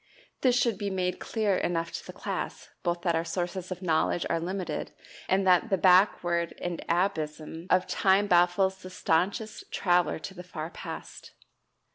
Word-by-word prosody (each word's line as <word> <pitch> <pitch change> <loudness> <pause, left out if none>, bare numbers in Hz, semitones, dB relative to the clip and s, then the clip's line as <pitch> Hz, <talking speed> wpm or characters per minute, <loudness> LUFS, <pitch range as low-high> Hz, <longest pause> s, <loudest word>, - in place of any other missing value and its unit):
This 250 -2 +4
should 230 -6 +1
be 205 - -1
made 185 -1 -1
clear 215 -4 0
enough 165 -1 -1
to - - -6
the - - -9
class - - -5
both 175 -1 -1
that 170 - +2
our 165 0 +1
sources 175 +2 -3
of 185 +1 -5
knowledge 165 0 +1
are 165 - +1
limited, 185 +2 -4 0.4
and 190 +1 +3
that 185 +4 +4
the 195 - +2
"backward 175 -2 +3
and 175 -1 -4
abysm" 165 -2 -1
of 185 0 +4
time 195 +2 +3
baffles 180 +1 +3
the 185 - -8
staunchest 185 +5 -1
traveler 175 -3 +2
to 160 - -8
the 180 - -8
far 165 -2 -6
past. - - -8
180 Hz, 165 wpm, -28 LUFS, 170-190 Hz, 0.4 s, This